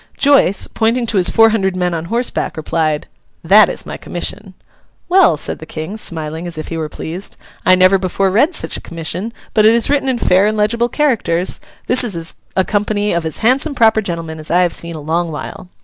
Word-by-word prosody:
Joice, 275 -9 +3
pointing 235 +2 0
to 225 -2 -1
his 180 -1 +3
four 225 -1 +5
hundred 190 -4 0
men 180 -1 -1
on 165 0 -3
horseback, 235 -3 -2
replied, 155 -1 -1 0.4
'That - - +6
is - - -6
my - - -6
commission.' 190 +2 -7 0.5
'Well,' 355 - +4
said - - -6
the 160 - -10
King, 155 +7 -6
smiling, 160 -4 -3
as 170 - -8
if 155 - -6
he 165 - -4
were 155 -1 -3
pleased, 175 +6 -6 0.3
'I 185 - +7
never 185 +1 +4
before 190 +1 0
read 280 - +2
such - - -1
a - - -9
commission; 170 +6 -4 0.2
but 215 - +3
it 220 +2 +6
is 235 +3 +2
written 280 -2 +1
in 255 - 0
fair 190 -2 +3
and 215 0 -1
legible 235 +3 +1
characters. 220 - 0 0.3
This 255 +1 +3
is 170 -8 -4 0.2
a 190 - +2
company 210 0 0
of 170 -1 -1
as 160 - -4
handsome 275 +5 +3
proper 220 -2 +4
gentlemen 165 -5 -5
as 155 - -10
I 175 +2 +3
have 175 - 0
seen 170 0 -4
a - - -6
long 165 +3 -2
while. 165 +4 -7
190 Hz, 210 wpm, -16 LUFS, 165-225 Hz, 0.5 s, I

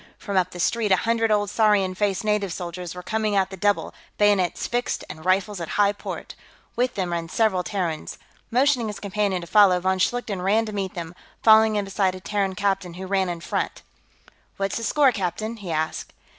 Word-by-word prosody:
From 200 - -5
up 185 -1 +2
the 180 - -10
street, 215 +4 +1
a - - +7
hundred 230 0 +2
odd 205 -1 +2
saurian 205 -3 +2
faced 195 +1 -1
native 210 -3 0
soldiers 175 0 -6
were 180 - -8
coming 215 +1 -1
at 195 -1 +1
the - - -5
double, 205 +2 0 0.2
bayonets 205 -4 +2
fixed 245 +1 -2
and 160 - -9
rifles 190 +1 +1
at 165 - -4
high 205 0 +4
port; 205 - -7 0.4
with 250 +1 0
them 185 -3 -2
ran 165 -1 -3
several 215 -4 +2
Terrans. 175 -4 -3 0.3
Motioning 255 -1 +2
his 210 - -5
companion 200 -2 -1
to - - -7
follow, 195 -2 +5
von 190 +1 0
Schlichten 210 -2 -1
ran 210 +5 +2
to 215 - -6
meet 195 -2 -3
them, 170 -1 -6 0.3
falling 220 -1 +6
in 205 -1 0
beside 195 -1 0
a - - -8
Terran 195 0 -1
captain 195 -2 -1
who 190 +1 -6
ran 190 -1 0
in 170 -1 -4
front. - - -3 0.7
"What's 195 0 -1
the 230 - -5
score, 280 +3 +4
captain?" 215 +2 -3
he 200 -4 -8
asked. 160 0 -2
195 Hz, 200 wpm, -24 LUFS, 185-215 Hz, 0.7 s, a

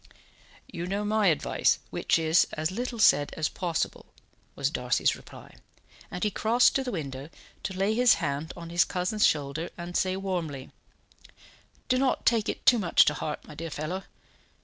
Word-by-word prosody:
"You 175 +1 -6
know 200 +2 -2
my 215 -1 +2
advice, 160 -4 +2
which - - +1
is, 160 +1 +3
as 155 +2 -2
little 240 +4 -4
said 145 -9 +4
as 155 -1 0
possible," 170 -4 -3 0.5
was - - -1
Darcy's - - +1
reply; - - -14 0.6
and 180 - -5
he 210 - +1
crossed 235 +4 +3
to 270 - 0
the 250 - -4
window, 140 - -5 0.3
to 190 - -4
lay 195 +3 +1
his 245 +1 +5
hand 145 +3 -3
on 170 -1 -8
his 170 -1 +4
cousin's 185 +4 +1
shoulder, 150 +3 -2
and 175 0 -7
say 185 0 +1
warmly: 170 -9 -4 1.2
"Do 255 - +2
not 265 -1 0
take 225 -3 +2
it - - -5
too 245 - +6
much 175 -5 +4
to 150 - +2
heart, 150 0 -5
my - - -10
dear 165 +2 -6
fellow. 155 +6 -5
175 Hz, 170 wpm, -27 LUFS, 155-210 Hz, 1.2 s, too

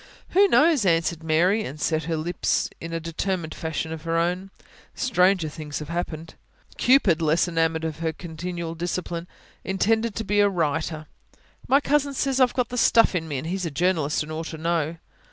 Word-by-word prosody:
"Who 400 +2 +5
knows?" 315 - +4
answered 165 -2 +1
Mary, 175 +7 +2
and 150 -3 -7
set 155 0 0
her 165 0 -1
lips 170 +2 -1
in 165 - -7
a 165 - -2
determined 165 0 -3
fashion 160 0 -4
of 160 - -7
her 165 +1 -1
own. 180 +3 -1 0.5
"Stranger 185 -8 +2
things 150 -1 -6
have 150 0 -7
happened." 165 -2 -4 0.5
Cupid, 215 - +4
less 160 +3 +2
enamoured 165 -1 0
of 160 0 -4 0.2
continual 170 0 -5
discipline, 175 0 -4 0.4
intended 220 +3 0
to 225 - -2
be 205 0 +1
a 205 0 +5
writer. 160 -3 -1 0.6
"My 275 - +5
cousin 285 -1 +1
says 270 0 0
I've 255 -2 +3
got 250 -2 0
the 245 - -2
stuff 230 -2 +5
in 165 -3 -2
me. 145 -3 -3
And 130 - -5
he's 180 +1 -2
a - - -2
journalist 155 -1 0
and 155 - -9
ought 160 +1 -4
to 160 - -7
know." 165 0 -1
170 Hz, 185 wpm, -24 LUFS, 160-195 Hz, 0.6 s, Who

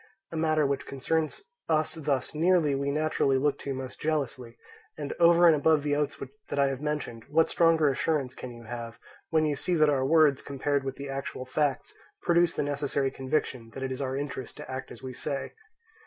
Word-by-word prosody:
A - - -6
matter 155 -1 +2
which 140 0 -1
concerns 155 - -1 0.3
us 155 -1 +2
thus 145 -5 -1
nearly 165 -2 +3
we 140 +1 -1
naturally 150 -2 +1
look 140 +1 +1
to 140 - -4
most 130 -1 -7
jealously; 130 -6 -2 0.4
and 145 -2 -4
over 170 0 +6
and 165 -2 +7
above 150 0 +3
the 145 -1 +1
oaths 145 -1 -1 0.3
that - - -3
I 140 -1 +4
have 135 0 -4
mentioned, 150 -6 -3
what 160 +2 +3
stronger 165 -2 +4
assurance 140 -1 0
can 130 - -8
you 120 -1 -11
have, 115 0 -7 0.3
when 160 -1 +3
you 150 -1 +1
see 175 +6 0
that 155 -2 +4
our 135 -2 +1
words, 150 -1 +4
compared 140 0 -1
with 135 0 -4
the 140 0 -7
actual 135 -1 -4
facts, 135 +1 -1 0.3
produce 170 0 +3
the - - 0
necessary 140 -1 -1
conviction 130 -4 -2
that 135 - -5
it 130 - -2
is 130 +2 -4
our 130 0 -2
interest 140 -3 -5
to - - -8
act 130 0 -5
as - - -11
we 130 -1 -5
say? 135 +2 -4
140 Hz, 200 wpm, -28 LUFS, 135-155 Hz, 0.4 s, and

